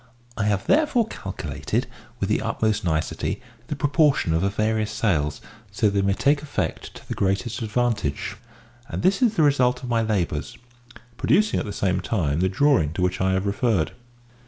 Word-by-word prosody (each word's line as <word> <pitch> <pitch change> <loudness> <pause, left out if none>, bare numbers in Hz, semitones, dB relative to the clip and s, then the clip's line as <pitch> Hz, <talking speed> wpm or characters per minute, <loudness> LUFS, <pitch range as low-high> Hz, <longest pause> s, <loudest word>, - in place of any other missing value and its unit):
I 105 - -1
have 100 -2 0
therefore 290 -6 +3
calculated, - - -3 0.3
with - - 0
the - - +1
utmost 110 -1 0
nicety, 80 +5 -1 0.3
the 150 - -3
proportion 145 - +2
of 80 - +2
her 100 - +2
various 110 +1 0
sails, 90 -10 0 0.3
so 105 +1 +2
that - - -3
they 100 0 +1
may 100 0 +1
take 140 +6 +2
effect 145 -1 -4
to - - -13
the - - -3
greatest 100 +5 -1
advantage; 110 - -1 0.5
and - - -4
this 190 +6 +3
is 230 -3 +3
the 160 - +3
result 125 -3 +3
of 125 - -5
my 115 -1 +2
labours," 95 -9 -1 0.6
producing 215 - +2
at - - -4
the - - -4
same 95 -2 0
time 80 -9 0
the 95 +1 +2
drawing 130 - +3
to 90 - -1
which 90 0 0
I 95 0 +2
have 95 +1 0
referred. 100 -4 +1
110 Hz, 180 wpm, -24 LUFS, 95-135 Hz, 0.6 s, therefore